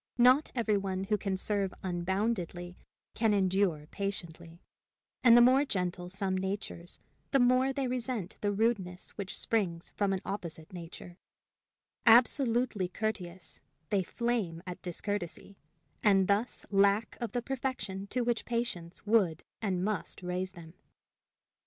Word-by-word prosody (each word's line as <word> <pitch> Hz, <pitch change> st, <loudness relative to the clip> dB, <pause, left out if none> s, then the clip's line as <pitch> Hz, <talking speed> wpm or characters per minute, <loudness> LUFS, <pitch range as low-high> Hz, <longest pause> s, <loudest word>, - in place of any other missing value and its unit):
Not 255 Hz, +5 st, +5 dB
every 220 Hz, -4 st, +2 dB
one 190 Hz, -1 st, -2 dB
who 210 Hz, +2 st, +1 dB
can 195 Hz, -2 st, -1 dB
serve 200 Hz, -1 st, -1 dB
unboundedly 180 Hz, -1 st, -2 dB, 0.4 s
can 220 Hz, -2 st, +2 dB
endure 190 Hz, -5 st, +1 dB
patiently; 170 Hz, -4 st, -5 dB, 0.6 s
and 235 Hz, -1 st, +8 dB
the 240 Hz, -, +8 dB
more 260 Hz, +3 st, +6 dB
gentle 180 Hz, -7 st, -2 dB
some 190 Hz, 0 st, -1 dB
natures, 190 Hz, -2 st, -4 dB, 0.3 s
the 275 Hz, -, +3 dB
more 255 Hz, +2 st, +4 dB
they 270 Hz, -1 st, -1 dB
resent 245 Hz, -6 st, -3 dB
the 205 Hz, -, +1 dB
rudeness 200 Hz, -4 st, -1 dB
which 200 Hz, -2 st, -6 dB
springs 180 Hz, -7 st, -1 dB
from 200 Hz, -1 st, 0 dB
an 190 Hz, -, 0 dB
opposite 170 Hz, -4 st, -6 dB
nature; 175 Hz, +1 st, -9 dB, 0.9 s
absolutely 235 Hz, -3 st, +4 dB
courteous, 185 Hz, -3 st, -4 dB, 0.3 s
they 200 Hz, -2 st, +3 dB
flame 200 Hz, -5 st, -2 dB
at 180 Hz, -1 st, -7 dB
discourtesy, 195 Hz, +1 st, -4 dB, 0.4 s
and 195 Hz, -3 st, +5 dB
thus 205 Hz, +5 st, 0 dB
lack 200 Hz, +2 st, +3 dB
of 235 Hz, -, -3 dB
the 245 Hz, -1 st, -1 dB
perfection 250 Hz, -8 st, -3 dB
to 250 Hz, -, -1 dB
which 240 Hz, -1 st, 0 dB
patience 220 Hz, -9 st, -3 dB
would 195 Hz, -7 st, +2 dB, 0.2 s
and 185 Hz, -4 st, 0 dB
must 210 Hz, -3 st, -3 dB
raise 180 Hz, +1 st, -2 dB
them. 165 Hz, -2 st, -12 dB
200 Hz, 135 wpm, -31 LUFS, 180-230 Hz, 0.9 s, and